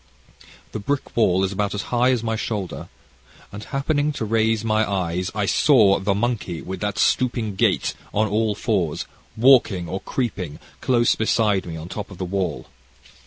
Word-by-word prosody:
"This 110 Hz, -, -5 dB
brick 140 Hz, +6 st, -3 dB
wall 95 Hz, -5 st, +3 dB
is 95 Hz, -, 0 dB
about 100 Hz, +1 st, -2 dB
as 105 Hz, -, -3 dB
high 120 Hz, +1 st, +4 dB
as 125 Hz, -3 st, +1 dB
my 115 Hz, -1 st, -1 dB
shoulder, 110 Hz, -5 st, -4 dB, 0.6 s
and 100 Hz, +1 st, -8 dB
happening 145 Hz, +1 st, 0 dB
to 115 Hz, -, -3 dB
raise 110 Hz, 0 st, +1 dB
my 110 Hz, 0 st, +2 dB
eyes 90 Hz, -1 st, -1 dB
I 105 Hz, -2 st, 0 dB
saw 105 Hz, -, +4 dB
the 100 Hz, +1 st, 0 dB
monkey, 105 Hz, -6 st, -2 dB
with 95 Hz, +1 st, -6 dB
that 105 Hz, -1 st, -2 dB
stooping 120 Hz, -2 st, +1 dB
gait, 95 Hz, -, +1 dB, 0.2 s
on 110 Hz, +1 st, +1 dB
all 105 Hz, +1 st, 0 dB
fours, 95 Hz, -8 st, -1 dB, 0.3 s
walking 115 Hz, -8 st, +4 dB
or 95 Hz, +4 st, -4 dB
creeping, 100 Hz, -, -3 dB, 0.2 s
close 120 Hz, -2 st, +3 dB
beside 110 Hz, -3 st, +1 dB
me, 80 Hz, -1 st, -5 dB
on 80 Hz, +1 st, -7 dB
top 105 Hz, +3 st, -6 dB
of 95 Hz, -, -11 dB
the 95 Hz, -, -3 dB
wall. 90 Hz, -3 st, -2 dB
105 Hz, 170 wpm, -22 LUFS, 95-115 Hz, 0.6 s, high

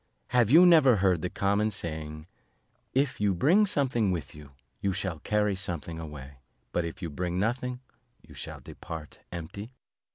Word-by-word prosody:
have 120 Hz, -3 st, +3 dB
you 165 Hz, +7 st, +8 dB
never 155 Hz, -8 st, +7 dB
heard 95 Hz, -4 st, +2 dB
the 90 Hz, -, -2 dB
common 100 Hz, +3 st, +1 dB
saying, 80 Hz, -5 st, -5 dB, 0.7 s
'If 135 Hz, -3 st, 0 dB
you 100 Hz, -2 st, +2 dB
bring 180 Hz, -, +4 dB
something 130 Hz, -, +1 dB
with 80 Hz, -8 st, -3 dB
you, 75 Hz, -2 st, -13 dB, 0.3 s
you 100 Hz, -1 st, 0 dB
shall 90 Hz, -4 st, -3 dB
carry 105 Hz, +3 st, +1 dB
something 85 Hz, -3 st, -4 dB
away, 70 Hz, -4 st, -9 dB, 0.3 s
but 85 Hz, -, 0 dB
if 85 Hz, +3 st, -7 dB
you 85 Hz, -, -2 dB
bring 90 Hz, +4 st, -2 dB
nothing, 125 Hz, +4 st, -1 dB, 0.5 s
you -, -, -14 dB
shall -, -, -7 dB
depart 80 Hz, -2 st, -9 dB
empty?'" 100 Hz, +8 st, -7 dB
95 Hz, 160 wpm, -28 LUFS, 80-120 Hz, 0.7 s, you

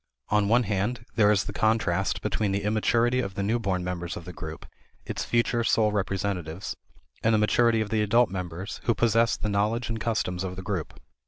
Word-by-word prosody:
On 105 Hz, -1 st, +2 dB
one 120 Hz, +3 st, +4 dB
hand, 110 Hz, +3 st, -2 dB
there 105 Hz, -2 st, +4 dB
is 100 Hz, -3 st, +3 dB
the -, -, -6 dB
contrast 95 Hz, -4 st, +1 dB
between 105 Hz, -3 st, 0 dB
the 100 Hz, -, -1 dB
immaturity 115 Hz, +4 st, +2 dB
of 95 Hz, -6 st, -3 dB
the 100 Hz, -, -2 dB
new 115 Hz, +4 st, +1 dB
born 95 Hz, -5 st, -1 dB
members 90 Hz, 0 st, -4 dB
of 85 Hz, -, -9 dB
the 90 Hz, -, -8 dB
group 80 Hz, -2 st, -8 dB, 0.4 s
its -, -, -3 dB
future 120 Hz, 0 st, +1 dB
sole 110 Hz, -1 st, +3 dB
representatives 95 Hz, -3 st, -2 dB, 0.5 s
and 110 Hz, 0 st, +3 dB
the -, -, +4 dB
maturity 115 Hz, +1 st, +3 dB
of 105 Hz, -, -4 dB
the 110 Hz, -1 st, +2 dB
adult 110 Hz, +2 st, +3 dB
members 90 Hz, +1 st, -5 dB
who 115 Hz, -, +2 dB
possess 115 Hz, 0 st, +3 dB
the -, -, -3 dB
knowledge 105 Hz, +3 st, 0 dB
and 115 Hz, 0 st, -2 dB
customs 95 Hz, -5 st, -1 dB
of 90 Hz, -1 st, -4 dB
the 95 Hz, -, -7 dB
group. 90 Hz, -5 st, -4 dB
105 Hz, 200 wpm, -27 LUFS, 95-115 Hz, 0.5 s, one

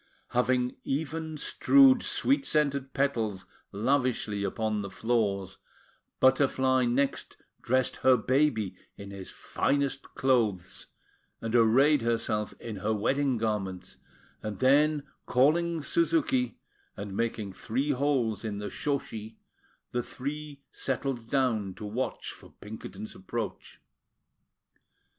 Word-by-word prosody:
Having 125 Hz, +1 st, +1 dB
even 160 Hz, +2 st, -3 dB
strewed 265 Hz, -, +5 dB
sweet 275 Hz, +1 st, +1 dB
scented 140 Hz, -3 st, +1 dB
petals 115 Hz, -9 st, -1 dB, 0.3 s
lavishly 115 Hz, -2 st, 0 dB
upon 105 Hz, +1 st, -1 dB
the 100 Hz, -, -5 dB
floors, 100 Hz, -5 st, -1 dB, 0.6 s
Butterfly 130 Hz, -1 st, +3 dB
next 135 Hz, +3 st, -1 dB, 0.2 s
dressed 130 Hz, +1 st, +1 dB
her 130 Hz, -1 st, +5 dB
baby 115 Hz, -6 st, +1 dB, 0.2 s
in 100 Hz, 0 st, -9 dB
his 95 Hz, -2 st, -8 dB
finest 140 Hz, -1 st, -1 dB
clothes, 115 Hz, -9 st, +1 dB, 0.5 s
and 115 Hz, 0 st, -4 dB
arrayed 130 Hz, +6 st, +5 dB
herself 115 Hz, -2 st, -1 dB
in 110 Hz, -3 st, -6 dB
her 110 Hz, +3 st, 0 dB
wedding 135 Hz, +4 st, +1 dB
garments; 95 Hz, -5 st, -3 dB, 0.4 s
and 105 Hz, -2 st, -5 dB
then, 145 Hz, +4 st, +4 dB, 0.2 s
calling 160 Hz, +5 st, +2 dB
Suzuki, 145 Hz, -6 st, +1 dB, 0.4 s
and 100 Hz, -1 st, -6 dB
making 110 Hz, -3 st, -2 dB
three 130 Hz, +9 st, -1 dB
holes 130 Hz, -6 st, 0 dB
in 105 Hz, -2 st, -3 dB
the 105 Hz, 0 st, -5 dB
shoshi, 115 Hz, -7 st, -3 dB, 0.6 s
the 120 Hz, -, 0 dB
three 145 Hz, +3 st, -6 dB
settled 130 Hz, -3 st, -3 dB
down 115 Hz, -8 st, +1 dB
to 105 Hz, -, -7 dB
watch 115 Hz, +6 st, -3 dB
for -, -, -15 dB
Pinkerton's 105 Hz, -1 st, -8 dB
approach. 110 Hz, +4 st, -6 dB
125 Hz, 110 wpm, -29 LUFS, 110-140 Hz, 0.6 s, strewed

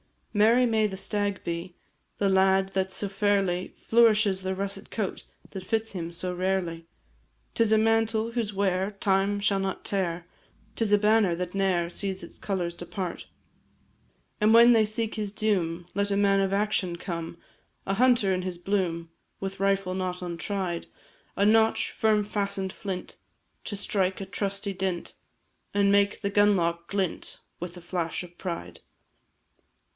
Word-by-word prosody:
Merry 230 Hz, +4 st, +5 dB
may 220 Hz, -2 st, +2 dB
the 190 Hz, -2 st, -6 dB
stag 205 Hz, 0 st, -2 dB
be, 170 Hz, +1 st, -4 dB, 0.4 s
The 200 Hz, -, +2 dB
lad 190 Hz, 0 st, +3 dB
that 190 Hz, -1 st, -1 dB
so 200 Hz, -, -1 dB
fairly 195 Hz, -2 st, 0 dB
Flourishes 215 Hz, -4 st, +4 dB
the 190 Hz, 0 st, -2 dB
russet 195 Hz, 0 st, -4 dB
coat 210 Hz, -4 st, -3 dB, 0.3 s
That 190 Hz, -2 st, -7 dB
fits 225 Hz, +2 st, -1 dB
him 170 Hz, -3 st, -5 dB
so 180 Hz, +1 st, -3 dB
rarely. 180 Hz, -3 st, -1 dB, 0.7 s
'Tis 225 Hz, -2 st, +2 dB
a -, -, +6 dB
mantle 225 Hz, 0 st, +2 dB
whose 230 Hz, -3 st, -2 dB
wear 190 Hz, 0 st, 0 dB
Time 200 Hz, 0 st, +1 dB
shall 200 Hz, -1 st, +2 dB
not 195 Hz, 0 st, -3 dB
tear; 175 Hz, -3 st, -1 dB, 0.5 s
'Tis 220 Hz, -3 st, +1 dB
a -, -, +8 dB
banner 210 Hz, -3 st, +3 dB
that 180 Hz, +1 st, -4 dB
ne'er 190 Hz, -3 st, +1 dB
Sees 190 Hz, +1 st, -3 dB
its 170 Hz, -, -11 dB
colours 180 Hz, -4 st, -2 dB
depart: 175 Hz, +1 st, -5 dB, 1.1 s
And 215 Hz, +1 st, +5 dB
when 235 Hz, +1 st, +8 dB
they 225 Hz, -2 st, +5 dB
seek 215 Hz, +1 st, -2 dB
his 210 Hz, -2 st, -2 dB
doom, 185 Hz, -6 st, 0 dB
Let 200 Hz, 0 st, 0 dB
a 200 Hz, -, +1 dB
man 200 Hz, -1 st, +4 dB
of 195 Hz, 0 st, +1 dB
action 200 Hz, -3 st, 0 dB
come, 170 Hz, -2 st, -5 dB, 0.5 s
A 195 Hz, -, 0 dB
hunter 240 Hz, -4 st, +4 dB
in 185 Hz, -, -1 dB
his 180 Hz, -1 st, -4 dB
bloom, 175 Hz, -3 st, -1 dB, 0.3 s
With 195 Hz, 0 st, -5 dB
rifle 195 Hz, -1 st, +1 dB
not 185 Hz, -1 st, -3 dB
untried: 175 Hz, +1 st, -3 dB, 0.5 s
A 200 Hz, -, +2 dB
notch'd, 220 Hz, +1 st, +3 dB
firm 215 Hz, -1 st, +2 dB
fasten'd 200 Hz, -2 st, -2 dB
flint, 190 Hz, -3 st, -6 dB, 0.5 s
To 205 Hz, -, -4 dB
strike 195 Hz, -2 st, 0 dB
a 195 Hz, -, -4 dB
trusty 200 Hz, +1 st, -3 dB
dint, 185 Hz, -2 st, -3 dB, 0.6 s
And 200 Hz, -1 st, +4 dB
make 200 Hz, 0 st, +3 dB
the 200 Hz, -, -1 dB
gun 205 Hz, 0 st, +5 dB
lock 170 Hz, -1 st, -1 dB
glint 195 Hz, -3 st, -2 dB, 0.2 s
With 175 Hz, +1 st, -6 dB
a -, -, -10 dB
flash 175 Hz, -1 st, -3 dB
of 175 Hz, -1 st, -13 dB
pride. 90 Hz, -, -5 dB
195 Hz, 160 wpm, -27 LUFS, 180-205 Hz, 1.1 s, a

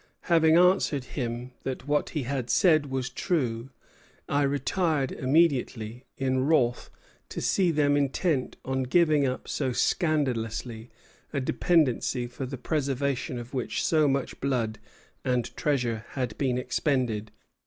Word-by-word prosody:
Having 165 Hz, -2 st, +4 dB
answered 180 Hz, -6 st, +3 dB
him 120 Hz, -1 st, -4 dB
that 130 Hz, 0 st, -5 dB
what 150 Hz, 0 st, +1 dB
he 145 Hz, -, 0 dB
had 130 Hz, -1 st, -3 dB
said 155 Hz, -5 st, +4 dB
was 130 Hz, -2 st, -2 dB
true, 125 Hz, -4 st, -2 dB, 0.6 s
I 145 Hz, -, +1 dB
retired 145 Hz, +1 st, 0 dB
immediately, 130 Hz, -5 st, +1 dB
in 130 Hz, -1 st, 0 dB
wrath 125 Hz, -6 st, +2 dB, 0.4 s
to -, -, -5 dB
see 185 Hz, -3 st, +2 dB
them 145 Hz, -3 st, +2 dB
intent 145 Hz, 0 st, 0 dB
on 130 Hz, 0 st, -1 dB
giving 150 Hz, +1 st, +3 dB
up 130 Hz, -, -4 dB
so 135 Hz, -3 st, -1 dB
scandalously 120 Hz, -7 st, -1 dB, 0.4 s
a 140 Hz, -, -1 dB
dependency 130 Hz, -3 st, +1 dB
for 125 Hz, +2 st, -6 dB
the 135 Hz, +1 st, -6 dB
preservation 140 Hz, -2 st, -1 dB
of 120 Hz, +2 st, -8 dB
which 120 Hz, -5 st, -2 dB
so 155 Hz, -2 st, +3 dB
much 135 Hz, -1 st, -1 dB
blood 115 Hz, -6 st, -1 dB, 0.4 s
and 125 Hz, -3 st, -1 dB
treasure 120 Hz, -7 st, 0 dB
had 125 Hz, -5 st, -2 dB
been 130 Hz, -3 st, +1 dB
expended." 125 Hz, -4 st, -1 dB
135 Hz, 130 wpm, -27 LUFS, 125-150 Hz, 0.6 s, Having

